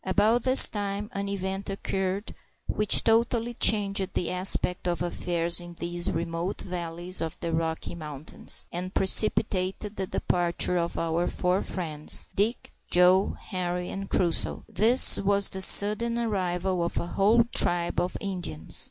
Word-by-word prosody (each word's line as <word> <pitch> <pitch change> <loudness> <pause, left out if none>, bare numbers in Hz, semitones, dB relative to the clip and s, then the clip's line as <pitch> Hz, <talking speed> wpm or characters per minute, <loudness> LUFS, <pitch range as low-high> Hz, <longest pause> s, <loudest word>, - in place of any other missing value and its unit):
About 210 +5 +1
this 260 +1 +9
time 205 0 -5
an 200 0 -5
event 195 0 -5
occurred 195 0 -4 0.3
which 210 -1 +4
totally 235 +1 0
changed 200 -4 +2
the 175 - -2
aspect 180 -1 -1
of 175 0 -2
affairs 175 0 0
in 175 0 -12
these 175 +1 -3
remote 170 +3 -4
valleys 175 0 -3
of 160 -1 -5
the 165 -1 -5
Rocky 160 0 -3
Mountains, 155 -3 -6
and 180 +2 -7
precipitated 195 0 +1
the 190 - -4
departure 175 0 -1
of 170 0 -3
our 165 +1 -2
four 180 +1 -1
friends, 155 -5 0
Dick, 215 +5 -2 0.2
Joe, 180 +2 +2
Henri, 180 -1 -4
and 195 0 -7
Crusoe. 170 -3 -1
This 235 +5 +5
was 200 0 +3
the 190 - -2
sudden 215 +5 +4
arrival 185 -5 -2
of 170 - -4
a - - -2
whole 210 +6 +2
tribe 175 -1 +1
of 180 - -3
Indians. 175 - -4
185 Hz, 145 wpm, -25 LUFS, 175-200 Hz, 0.3 s, this